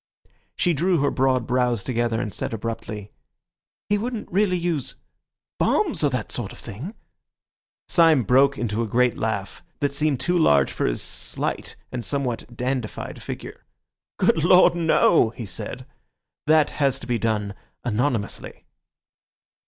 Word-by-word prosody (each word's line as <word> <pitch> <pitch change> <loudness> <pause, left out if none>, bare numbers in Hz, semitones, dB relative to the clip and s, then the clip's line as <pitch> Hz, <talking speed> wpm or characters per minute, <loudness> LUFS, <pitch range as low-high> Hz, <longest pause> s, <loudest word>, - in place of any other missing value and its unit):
She 175 - +2
drew 175 +4 +2
her 145 - +2
broad 130 -2 +1
brows 125 -4 +1
together 120 -1 0
and 115 -4 -3
said - - -3
abruptly— 110 -2 -5 0.8
"He 205 0 +1
wouldn't 235 0 -4
really 190 0 +2
use—bombs 170 -6 -2
or - - +4
that - - -3
sort - - -4
of - - -12
thing?" 150 - -8 0.9
Syme 165 -7 +5
broke 135 +4 +4
into 115 -1 -1
a 115 - -1
great 125 +2 +2
laugh, 100 -4 -3 0.2
that 145 -1 0
seemed 145 -2 +1
too 175 +6 +1
large 70 - +4
for - - -1
his - - -1
slight - - -4 0.2
and 125 -2 -4
somewhat 125 -4 -3
dandified 125 -3 -3
figure. - - -8 0.5
"Good 160 - +2
Lord, 180 +1 +6
no!" 165 -8 +4
he 115 0 -7
said, 115 +5 -6 0.6
"that 155 -1 +4
has 135 -2 0
to - - -8
be 120 -2 -1
done 105 -3 -1 0.3
anonymously." 120 -2 -2
125 Hz, 140 wpm, -24 LUFS, 115-155 Hz, 0.9 s, Lord